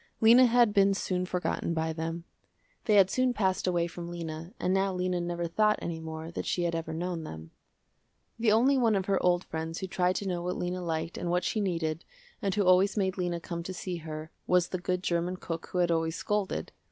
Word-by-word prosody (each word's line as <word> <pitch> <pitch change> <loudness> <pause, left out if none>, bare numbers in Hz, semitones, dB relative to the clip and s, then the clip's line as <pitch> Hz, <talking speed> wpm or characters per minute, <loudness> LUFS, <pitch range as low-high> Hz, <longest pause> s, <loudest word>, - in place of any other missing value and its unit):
Lena 240 +3 +7
had 235 -2 +4
been 195 -1 +4
soon 180 -1 -1
forgotten 180 -2 -1
by 160 0 -1
them. 165 +1 -4 0.6
They 215 - +3
had 195 -2 +6
soon 255 -1 +1
passed 190 -3 0
away 175 -2 +2
from 170 0 -7
Lena 165 0 -6
and 185 - +1
now 195 0 +2
Lena 180 -1 0
never 175 0 -2
thought 210 +5 +2
any 165 -1 -4
more 160 0 -6
that - - -5
she 175 - 0
had 170 -1 0
ever 165 -1 -3
known 170 0 -3
them. 80 - -9 0.9
The 225 -2 +3
only 260 +5 +4
one 230 -3 +3
of 190 -1 0
her 195 -1 +1
old 180 0 +2
friends 160 +1 -5
who - - -3
tried 180 0 +1
to 200 - -2
know 175 -2 -1
what 180 +1 -2
Lena 180 +1 -2
liked 165 -1 -3
and 175 - -3
what 180 +1 +1
she 215 - 0
needed, 165 -4 -1 0.4
and 195 -2 0
who 205 - +2
always 185 +3 +4
made 190 -2 0
Lena 175 -1 -1
come 170 0 -5
to 185 +2 -6
see 180 0 -4
her, 155 -1 -7 0.2
was 180 -1 +3
the 185 - -3
good 180 +1 -2
german 175 +1 0
cook 165 -2 -5
who - - -5
had 175 -1 +3
always 165 0 0
scolded. 210 0 -2
180 Hz, 225 wpm, -29 LUFS, 170-195 Hz, 0.9 s, Lena